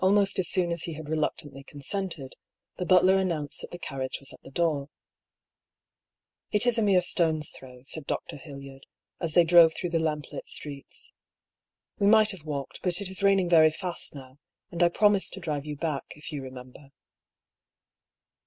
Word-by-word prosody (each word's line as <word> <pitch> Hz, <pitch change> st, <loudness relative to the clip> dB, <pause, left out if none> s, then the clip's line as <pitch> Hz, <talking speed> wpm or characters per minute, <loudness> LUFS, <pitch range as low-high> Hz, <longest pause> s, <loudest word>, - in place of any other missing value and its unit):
Almost 195 Hz, +1 st, +3 dB
as 180 Hz, -, +4 dB
soon 175 Hz, -2 st, +3 dB
as 170 Hz, -1 st, 0 dB
he 165 Hz, -, -5 dB
had 155 Hz, -1 st, -8 dB
reluctantly 150 Hz, -3 st, -2 dB
consented, 145 Hz, 0 st, -4 dB, 0.4 s
the 180 Hz, -, -3 dB
butler 185 Hz, +1 st, +5 dB
announced 165 Hz, -5 st, -1 dB
that -, -, -8 dB
the 175 Hz, -, -7 dB
carriage 135 Hz, -6 st, -5 dB
was 140 Hz, 0 st, -5 dB
at -, -, -15 dB
the -, -, -13 dB
door. 150 Hz, -2 st, 0 dB, 0.8 s
" -, -, -63 dB
It 210 Hz, +3 st, +2 dB
is 240 Hz, -2 st, +3 dB
a -, -, +2 dB
mere 195 Hz, -4 st, +4 dB
stone's 160 Hz, -4 st, +1 dB
throw," 125 Hz, -1 st, -13 dB
said 150 Hz, +1 st, -3 dB
Dr. -, -, -3 dB
Hildyard, 140 Hz, -2 st, -11 dB, 0.3 s
as 165 Hz, -2 st, -2 dB
they 175 Hz, -, +7 dB
drove 165 Hz, -1 st, +6 dB
through 175 Hz, -, -4 dB
the 165 Hz, -, +1 dB
lamplit 150 Hz, -2 st, -3 dB
streets. 140 Hz, -2 st, -5 dB, 0.4 s
" -, -, -48 dB
We 200 Hz, -, +3 dB
might 215 Hz, 0 st, +6 dB
have 180 Hz, -6 st, -10 dB
walked; 140 Hz, -3 st, -5 dB
but 175 Hz, -2 st, 0 dB
it 195 Hz, -2 st, -3 dB
is 190 Hz, -, -3 dB
raining 195 Hz, -2 st, +3 dB
very 160 Hz, -2 st, +7 dB
fast 170 Hz, 0 st, -3 dB
now, 130 Hz, 0 st, -12 dB, 0.3 s
and 170 Hz, -, -4 dB
I 175 Hz, -, +6 dB
promised 205 Hz, +2 st, +2 dB
to -, -, -7 dB
drive 150 Hz, -4 st, -4 dB
you 150 Hz, -, -4 dB
back, 150 Hz, -2 st, -3 dB
if 150 Hz, +2 st, -9 dB
you 145 Hz, -2 st, -4 dB
remember." 130 Hz, +1 st, -11 dB
160 Hz, 185 wpm, -27 LUFS, 140-185 Hz, 0.8 s, they